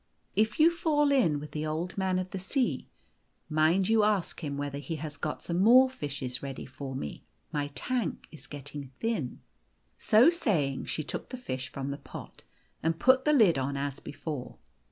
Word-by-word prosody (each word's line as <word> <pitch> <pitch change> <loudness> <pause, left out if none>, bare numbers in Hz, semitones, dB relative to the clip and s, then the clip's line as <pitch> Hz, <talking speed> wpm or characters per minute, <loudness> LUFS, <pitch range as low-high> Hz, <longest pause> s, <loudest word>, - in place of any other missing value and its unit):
If 215 +3 +2
you 320 +2 +7
fall 295 -4 +2
in 170 - +3
with 150 +1 -8
the 150 - -3
Old 165 +3 -3
Man 190 -1 +1
of 185 0 -3
the 190 - -4
Sea, 250 +7 -1 0.6
niind 160 +5 +3
you 220 -1 +4
ask 205 -5 0
him 140 -2 -3
whether 140 0 -3
he 145 +3 -4
has 155 0 -5
not - - -29
got 150 - -3
some 170 0 -1
more 255 +5 +7
fishes 140 - -4
ready 135 -1 -6
for 135 0 -7
me. 75 - -5 0.3
My 145 -1 -1
tank 245 -9 -2
is 160 - -11
getting 145 -1 -7
thin." 220 - -2 0.6
So 235 +10 +6
saying, 160 - 0
she 155 - -2
took - - -5
the 255 - -5
fish 130 - -4
from 135 +1 -4
the 140 - -5
pot, - - -10 0.4
and 165 0 0
put 260 +6 +4
the 300 - +5
lid 205 - +5
on 140 +1 -1
as 140 0 -3
before. 145 -3 -6
160 Hz, 190 wpm, -29 LUFS, 140-220 Hz, 0.6 s, you